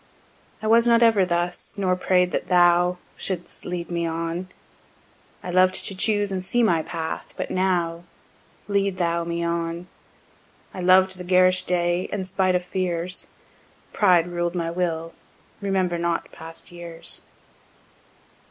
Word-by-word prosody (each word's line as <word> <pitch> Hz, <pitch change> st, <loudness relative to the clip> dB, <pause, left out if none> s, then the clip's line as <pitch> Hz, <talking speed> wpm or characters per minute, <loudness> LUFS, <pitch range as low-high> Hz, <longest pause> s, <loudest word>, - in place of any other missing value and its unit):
I -, -, -3 dB
was 230 Hz, +2 st, +5 dB
not 235 Hz, 0 st, +5 dB
ever 220 Hz, -5 st, +5 dB
thus, 175 Hz, +3 st, -2 dB
nor 185 Hz, -2 st, +1 dB
pray'd 180 Hz, 0 st, +2 dB
that -, -, -2 dB
thou 175 Hz, 0 st, +4 dB, 0.2 s
Should'st 180 Hz, -3 st, -4 dB
lead 175 Hz, -1 st, -4 dB
me 170 Hz, -1 st, -1 dB
on; 165 Hz, +2 st, -3 dB, 0.9 s
I 180 Hz, -, -4 dB
lov'd 185 Hz, +1 st, +4 dB
to -, -, -2 dB
choose 205 Hz, +1 st, +1 dB
and 185 Hz, -1 st, -3 dB
see 240 Hz, +5 st, +1 dB
my 170 Hz, -7 st, +3 dB
path; 160 Hz, 0 st, -5 dB
but -, -, -4 dB
now 175 Hz, -2 st, 0 dB, 0.6 s
Lead 200 Hz, -2 st, 0 dB
thou 170 Hz, -1 st, 0 dB
me 170 Hz, 0 st, -2 dB
on. 170 Hz, +1 st, -2 dB, 0.9 s
I 185 Hz, -, -6 dB
loved 185 Hz, +1 st, +4 dB
the -, -, -5 dB
garish 185 Hz, 0 st, +4 dB
day, 175 Hz, 0 st, 0 dB
and 195 Hz, -2 st, -3 dB
spite 190 Hz, -1 st, +1 dB
of 180 Hz, 0 st, -1 dB
fears 180 Hz, -1 st, -2 dB, 0.7 s
Pride 180 Hz, -5 st, +4 dB
ruled 175 Hz, 0 st, -2 dB
my 165 Hz, -1 st, -2 dB
will; 165 Hz, -2 st, -2 dB, 0.5 s
remember 190 Hz, -3 st, 0 dB
not 170 Hz, 0 st, -2 dB
past 165 Hz, +1 st, -9 dB
years. 170 Hz, -1 st, -7 dB
180 Hz, 145 wpm, -24 LUFS, 170-185 Hz, 0.9 s, was